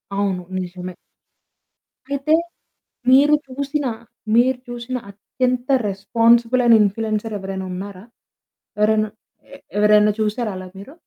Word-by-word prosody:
అవును 195 -3 -1 0.2
నిజమే. 180 0 -6 1.2
అయితే 280 +2 0 0.8
మీరు 285 +3 +6
చూసిన 280 +2 -3 0.5
మీరు 250 +2 +4
చూసిన 240 +1 -5
అత్యంత 250 +5 -2 0.2
రెస్పాన్సిబులయినా 230 +4 +3
ఇంప్ల్యూయన్సర్స్ 215 +1 -2
ఎవరైనా 190 -1 -5
ఉన్నారా? 190 +1 -7 0.7
ఎవరైనా 215 0 +2 0.5
ఏ - - -9 0.2
ఎవరైనా 210 0 +5
చూసారా 215 +1 -1
అలా 185 0 -7
మీరు? 235 +9 -11
220 Hz, 100 wpm, -20 LUFS, 200-255 Hz, 1.2 s, మీరు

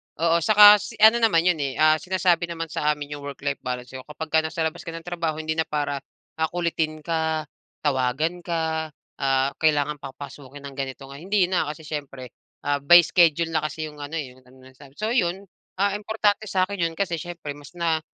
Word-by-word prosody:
oo, 170 +1 +2
saka 210 +3 +8
si 225 - -8
ano 220 +2 +8
naman 205 -8 +3
'yon, 180 -4 +2
eh, 135 -2 -2
ah, 155 0 +4
sinasabi 180 -2 +1
naman 165 -2 -5
sa 150 +1 +1
amin 145 0 -8
'yung 145 -1 -7
work-life 140 0 -4
balance 125 -1 -5
niyo. 130 -1 -9
Kapagka 160 +1 0
nasa 160 +1 -2
labas 160 +1 -4
ka 165 - -5
ng 165 - -8
trabaho 170 -3 -3
hindi 155 +1 -3
na 160 - +1
para, 145 -2 -2 0.4
ah, 160 - +2
kulitin 160 -3 -2
ka, 160 -1 -1 0.4
tawagan 145 +5 0
ka, 160 -2 -2 0.3
ah, 135 0 +1
kailangan 150 -2 +1
papasukin 140 0 -10
ng 140 -1 -9
ganitong, 135 0 -6
ah, 140 - -9
hindi 190 +1 +1
na 170 -4 +1
kasi 155 +1 -7
siyempre, 135 -5 -7 0.3
ah, 145 0 0
by 175 +5 +8
schedule 165 -1 +3
na 155 - +2
kasi 155 +1 -6
'yong 150 - -15
ano, 145 +3 -6
eh, 140 -5 -4
'yong 130 - -19
ano 130 +1 -17
sa'min. 140 +1 -17
So 215 +2 -2
'yon, 190 -4 0 0.3
ah, 200 +2 +1
importante 210 0 0
sa'kin 190 0 -1
'yon 165 - -9
kasi 175 -3 -2
siyempre 170 -3 -7
mas 145 +3 -12
na 165 -2 0
160 Hz, 200 wpm, -24 LUFS, 145-175 Hz, 0.4 s, saka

